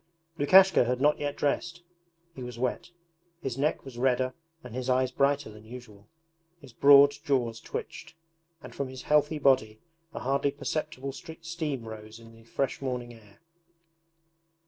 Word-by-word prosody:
Lukashka 190 +5 +6
had 125 +1 -1
not 150 +2 +3
yet 145 -1 -2
dressed. 170 +4 -2 0.5
He 130 - -10
was 125 -1 -7
wet. 125 +7 -2 0.5
His 130 -3 -3
neck 140 +2 -1
was 125 -3 -9
redder 130 0 +1 0.3
and 125 -2 -10
his 130 +1 -4
eyes 130 0 +2
brighter 140 -2 +1
than 105 0 -14
usual, 110 -3 -12 0.5
his 135 -6 -15
broad 140 +2 +7
jaws 125 -7 0
twitched, 160 - -7 0.5
and - - -10
from 140 - -3
his 130 0 -9
healthy 150 +1 +2
body 130 -7 +2 0.3
a - - -7
hardly 140 +2 +1
perceptible 140 -1 -4
steam 160 -4 -6
rose 110 0 -9
in 115 0 -14
the 115 0 -18
fresh 135 +4 -2
morning 125 -2 -4
air. 105 -3 -19
130 Hz, 150 wpm, -28 LUFS, 120-145 Hz, 0.5 s, broad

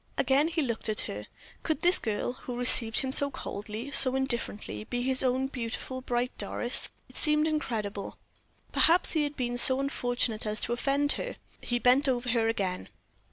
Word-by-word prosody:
Again 280 +3 +2
he 330 -2 -1
looked 235 -4 -3
at 215 - +3
her. 105 +1 -7 0.3
Could 315 - -2
this 355 +1 +6
girl, 220 +2 -3
who 250 -1 -8
received 240 -2 +6
him 265 - -3
so 280 +1 +4
coldly, 215 +1 -7
so 265 -1 +3
indifferently, 235 - -3
be 245 0 -3
his 260 0 +4
own 260 0 +1
beautiful, 260 0 -5
bright 245 0 -2
Doris? 245 +1 0 0.2
It - - -14
seemed 300 0 +3
incredible. 215 -10 -4 0.5
Perhaps 340 +3 +3
he 315 - 0
had 290 0 -3
been 245 -2 -3
so 260 +2 +4
unfortunate 245 -5 -1
as 210 0 -3
to 235 - 0
offend 280 +4 0
her. - - -6 0.3
He 240 - -2
bent 255 +4 +3
over 245 -1 -1
her 230 -1 +1
again. 190 -5 -3
250 Hz, 175 wpm, -28 LUFS, 230-275 Hz, 0.5 s, this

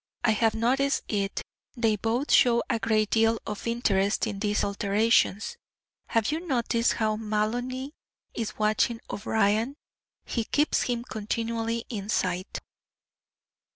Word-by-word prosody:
"I 230 - +4
have 220 +1 +2
noticed 265 +5 +1
it. 200 -2 -2 0.3
They 225 -2 +2
both 230 +7 -1
show 235 -2 +5
a 230 - 0
great 215 -2 +1
deal 225 0 +3
of 210 +1 -5
interest 205 -4 +1
in 205 -3 -4
these 210 0 0
alterations. 205 - +1 0.5
Have 225 +3 +1
you 310 - -1
noticed 240 -7 +1
how 215 -1 0
Maloney 240 +6 -2 0.4
is 225 -2 -4
watching 215 +2 +1
O'Brien? 220 +4 +1 0.5
He 230 -3 -2
keeps 295 +6 +1
him 240 -1 -1
continually 230 0 -3
in 205 -3 -5
sight." 185 -1 -1
225 Hz, 125 wpm, -27 LUFS, 210-235 Hz, 0.5 s, show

